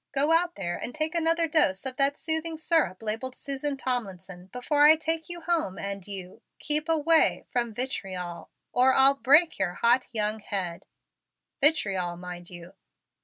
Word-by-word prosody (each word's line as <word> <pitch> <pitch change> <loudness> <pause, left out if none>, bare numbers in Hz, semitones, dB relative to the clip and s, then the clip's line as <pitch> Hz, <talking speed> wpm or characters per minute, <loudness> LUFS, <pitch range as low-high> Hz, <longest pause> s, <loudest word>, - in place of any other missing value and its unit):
Go 285 +3 +1
out 345 +1 +2
there 175 -3 -4
and 245 - -7
take 310 0 -2
another 330 0 +1
dose 285 - +1
of 260 -1 -4
that 280 +1 +1
soothing 320 0 -2
syrup 310 - 0
labeled 225 +4 -4
Susan 275 +1 -3
Tomlinson, 195 -8 -5
before 290 +7 +2
I 315 - +7
take 320 +1 -3
you 345 0 -6
home, 320 - -1
and 200 -1 -6
you 195 +1 -9 0.2
keep 305 +2 +1
away 325 0 +2
from 240 -2 -1
vitriol 185 -8 -5 0.2
or 260 +1 +3
I'll 270 +1 +7
break 290 +3 +3
your 180 -2 -1
hot 240 +2 +2
young 215 -1 -1
head. 190 -6 -5 0.8
Vitriol, 195 - +4
mind 175 -1 -9
you!" 175 0 -12
255 Hz, 160 wpm, -26 LUFS, 190-310 Hz, 0.8 s, I